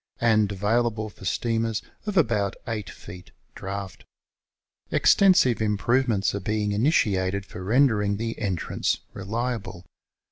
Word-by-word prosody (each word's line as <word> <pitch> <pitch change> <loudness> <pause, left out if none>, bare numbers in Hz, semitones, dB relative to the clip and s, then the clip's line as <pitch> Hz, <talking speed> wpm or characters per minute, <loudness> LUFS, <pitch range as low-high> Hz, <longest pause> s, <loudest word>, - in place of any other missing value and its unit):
and 110 -3 +3
available 110 +2 0
for 95 - -13
steamers 115 +2 -1 0.2
of 205 -2 -2
about 105 - +2
8 110 -4 -4
feet 90 -1 -11 0.2
draft. 95 -1 -6 0.9
Extensive 180 - +4
improve 110 +5 +1
ments 100 -4 +1
are 100 - -2
being 105 +1 -1
initiated 100 -5 +1
for 90 - -9
rendering 105 -2 +2
the 115 +1 -3
entrance 95 -6 -1
reliable. 110 -2 -4
105 Hz, 115 wpm, -25 LUFS, 100-115 Hz, 0.9 s, Extensive